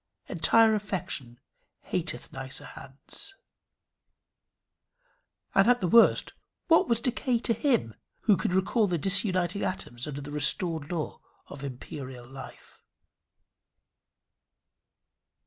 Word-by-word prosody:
Entire 220 +6 +4
affection 175 - -4 0.5
hateth - - -3
nicer 130 0 -5
hands. 135 - -11 2.2
And 195 +2 +5
at 245 0 +5
the 180 - 0
worst, 230 +6 +5 0.3
what 330 - +4
was 230 -1 +2
decay 250 0 0
to 230 0 +1
him, 230 - +1 0.3
who 210 - +4
could 180 - -2
recall 200 +4 +2
the 175 -2 0
disuniting 185 0 +2
atoms 125 -9 -4
under 145 -1 -5
the 145 +1 -8
restored 160 +1 0
law 165 -3 -4 0.3
of 140 0 -9
imperial 130 -1 -8
life? 135 +1 -12
180 Hz, 105 wpm, -28 LUFS, 140-215 Hz, 2.2 s, And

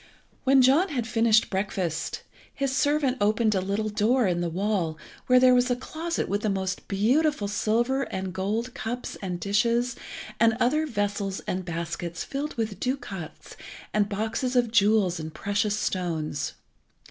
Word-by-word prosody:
When 265 0 +6
John 295 +10 +4
had 250 -6 -2
finished 225 -1 +3
breakfast, 190 -4 -2 0.3
his 275 -1 -2
servant 285 -2 +2
opened 215 +1 +3
a 190 - +1
little 200 +3 -1
door 220 +4 +2
in 175 -2 +1
the 175 - -1
wall, 180 -3 -1 0.3
where 255 0 +6
was 250 0 +3
a 245 - +2
closet 325 +6 -3
with 205 +1 -1
the 215 - 0
most 190 -1 -2
beautiful 240 +4 +2
silver 235 +6 +1
and 190 -1 -4
gold 215 +6 -2
cups 235 +3 -4
and 180 -3 -3
dishes 230 +6 +1 0.4
and 225 0 +4
other 305 +6 +2
vessels 205 -4 -2
and 185 0 -3
baskets 170 0 -4
filled 285 +2 -4
with 220 -4 -3
ducats 245 - -5 0.4
and 210 -1 +2
boxes 225 +5 -2
of 240 -2 +3
jewels 205 -5 +3
and 155 0 -7
precious 205 +1 0
stones. 165 -7 -2
215 Hz, 150 wpm, -26 LUFS, 195-250 Hz, 0.4 s, When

